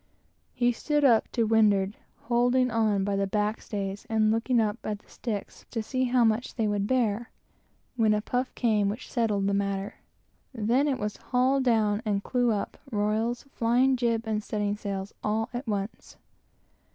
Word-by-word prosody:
He 245 0 +2
stood 295 +5 0
up 230 -4 +4
to 235 - +1
windward, 210 -2 +3 0.3
holding 245 +1 +2
on 215 -3 +2
by 200 0 0
the 195 0 0
backstays, 205 -1 -3
and 215 -1 +3
looking 230 +2 +1
up 215 0 0
at 210 - -3
the - - -28
sticks, 215 -5 -6
to 225 -2 -3
see 255 +3 -1
how 245 -1 +3
much 225 +2 +1
they 225 -3 0
would 205 -1 0
bear; 235 -2 0 0.7
when 220 -3 +3
a - - +1
puff 250 +2 -1
came 215 -4 +2
which 220 +5 -6
settled 215 -5 +1
the 200 - +1
matter. 200 0 -2 0.6
Then 240 +6 +2
it 275 -3 +1
was 210 -3 -3
"haul 260 +2 +1
down," 220 -4 +2
and 205 -3 -1
"clew 245 -1 +1
up," 205 -2 -3
royals, 220 +3 0
flying 245 +3 +3
jib, 230 -2 0
and 215 -1 -1
studding 205 -1 -1
sails, 200 -1 -5
all 220 +1 0
at 245 +1 -5
once. 205 0 -4
220 Hz, 170 wpm, -27 LUFS, 205-245 Hz, 0.7 s, up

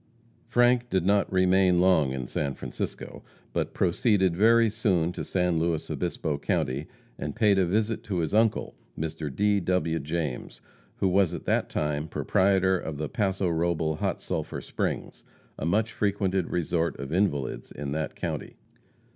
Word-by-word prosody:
Frank 120 0 +3
did 95 -2 +1
not 100 +1 +2
remain 95 -1 +4
long 90 -7 +4
in 65 -2 -3
San 70 +2 -2
Francisco, - - -6 0.3
but - - -2
proceeded 95 0 +2
very 115 +4 +5
soon 95 -6 +1
to - - -5
San 90 -3 0
Luis 80 -1 -1
Obispo 80 -4 -2
county, 70 +1 -1 0.3
and - - -4
paid 105 -4 +4
a 90 - +2
visit 110 +4 0
to 95 -4 -2
his 85 +1 -1
uncle, 110 0 +2 0.2
Mr. 80 -1 -3
D. 100 +7 +2
W. 90 -3 0
James, 75 -2 -4 0.4
who 95 - +1
was 95 -2 +2
at - - -8
that - - +1
time 75 0 -1
proprietor 95 +2 +2
of 80 -3 -5
the 75 +1 -3
Paso 95 -4 0
Robel 80 -2 0
Hot - - -1
Sulphur - - -4
Springs, - - -4 0.4
a 80 - -2
much 110 +6 +1
frequented 95 -3 0
resort 85 -2 -1
of 70 +3 -5
invalids 80 -8 -1
in 70 -1 -5
that 80 0 -3
county. - - -4
90 Hz, 155 wpm, -27 LUFS, 80-100 Hz, 0.4 s, very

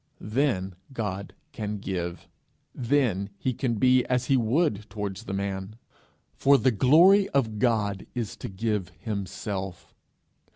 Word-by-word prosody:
Then 110 -9 +1 0.2
God 100 -6 -4 0.2
can 105 -5 -4
give; 90 -3 -4 0.5
then 115 -7 +1
he 130 +5 -1
can 120 0 -1
be 125 +3 +4
as 125 0 0
he 135 - +3
would 115 - +1
towards 105 0 -5
the - - -5
man; 100 +1 -3 0.6
for 140 0 +5
the 130 -1 +3
glory 170 - +6
of 110 -6 +1
God 105 -5 +1
is 115 -5 -3
to - - -6
give 105 -1 -2
himself. 95 -3 -5
110 Hz, 130 wpm, -27 LUFS, 100-130 Hz, 0.6 s, glory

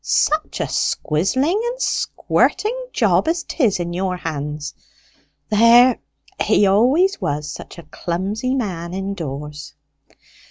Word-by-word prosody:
Such 310 +1 +1
a - - 0
squizzling 260 - 0
and 485 +1 -3
squirting - - 0
job - - +2
as 335 +2 0
'tis 230 - 0
in 175 0 -3
your 185 0 -2
hands! 150 -2 -5 0.8
There, 235 +3 +6 0.4
he 205 - +3
always 265 - +3
was 145 0 -2
such - - -10
a 170 - -10
clumsy 195 - -3
man 180 -8 -3
indoors." 150 -7 -6
195 Hz, 115 wpm, -20 LUFS, 165-265 Hz, 0.8 s, There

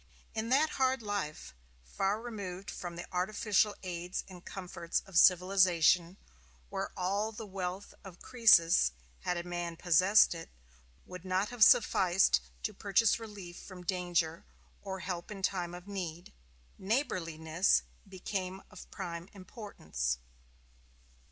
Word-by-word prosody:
In 225 +1 -3
that 300 +4 +3
hard 260 -2 +2
life, 200 - -4 0.3
far 195 - -1
removed 200 -5 -6
from 175 -1 -6
the 170 - -6
artificial 205 +3 +1
aids 180 0 -4
and 180 -2 -12
comforts 175 -3 -4
of 195 - -13
civilization, 180 -1 +4 0.5
where - - -3
all 200 +4 0
the 220 0 -8
wealth 190 0 -5
of 185 -3 -11
Croesus, 170 - +5 0.3
had 180 - -2
a 170 - -3
man 175 -1 -4
possessed 185 +5 +5
it, 165 -1 -8 0.6
would 180 -1 -9
not 185 +2 0
have 245 -2 +3
sufficed 185 - +5 0.2
to - - -2
purchase 210 +2 +2
relief 200 -6 -9
from 185 -2 -11
danger, 175 -2 -1 0.4
or 190 -1 -6
help 175 -2 -5
in 195 -2 -8
time 175 -3 -1
of 180 +2 -11
need, 175 -4 -6 0.5
neighborliness 180 - +1 0.3
became 190 0 -4
of - - -12
prime 170 -1 -6
importance. 80 - -4
185 Hz, 125 wpm, -32 LUFS, 175-200 Hz, 0.6 s, Croesus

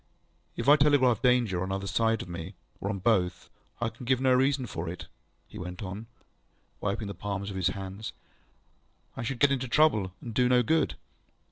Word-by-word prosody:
ŌĆ£If - - -3
I 145 - +9
telegraph 140 -6 +4
Danger, 120 -8 +3
on 95 +1 -2
either 95 0 -2
side 115 +2 +1
of - - -12
me, 85 +2 -7 0.2
or 100 - -3
on 100 - -2
both, 95 -3 0 0.3
I 120 -1 0
can 115 +3 -12
give 130 +1 +2
no 130 -1 +4
reason 130 +1 +2
for 85 -6 -5
it, 90 - -6
ŌĆØ - - -8 0.4
he - - -10
went 90 +2 -6
on, 100 +4 -6 0.7
wiping 105 +1 -2
the 100 - -4
palms 100 +1 -4
of - - -7
his 95 -3 +1
hands. 95 +2 -5 1.0
ŌĆ£I - - -4
should 125 +1 -3
get 145 +1 +5
into 130 -2 0
trouble, 115 -9 +3
and 115 - -7
do 125 +2 +3
no 125 -1 +5
good. 160 +7 +1
110 Hz, 200 wpm, -28 LUFS, 95-125 Hz, 1.0 s, I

